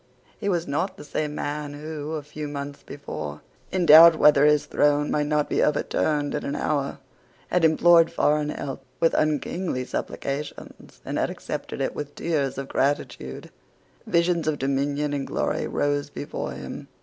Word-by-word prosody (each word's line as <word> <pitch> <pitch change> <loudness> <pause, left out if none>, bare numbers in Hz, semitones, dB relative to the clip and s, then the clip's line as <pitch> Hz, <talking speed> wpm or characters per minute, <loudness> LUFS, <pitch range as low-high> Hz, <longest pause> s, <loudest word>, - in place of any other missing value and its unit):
He 205 - -1
was 170 -3 0
not 160 +7 -2
the - - -9
same 150 0 -3
man 145 0 -4
who, 155 0 -6
a 155 -2 -3
few 150 +1 -7
months 140 0 -6
before, 75 0 -7 0.3
in 185 -1 +1
doubt 165 +1 +10
whether 145 -2 +6
his 150 -1 +3
throne 145 0 +2
might 150 -1 +1
not 150 -1 +1
be - - 0
overturned 150 -1 0
in 145 -1 -3
a - - -3
hour, 140 -2 -1 0.5
had 180 -1 +1
implored 165 +1 +5
foreign 150 0 +1
help 135 -2 -5 0.2
with 165 - +3
unkingly 155 -1 -1
supplications, 140 +3 -6
and - - -2
had - - 0
accepted - - -5
it - - -1
with 145 -1 -6
tears 145 -6 -1
of 135 0 -4
gratitude. 130 - -2 0.6
Visions 170 -1 +1
of 155 -2 +1
dominion 140 +2 -1
and 140 -1 -2
glory - - -1
rose 145 0 -1
before 145 - -5
him. - - -8
150 Hz, 160 wpm, -25 LUFS, 145-155 Hz, 0.6 s, doubt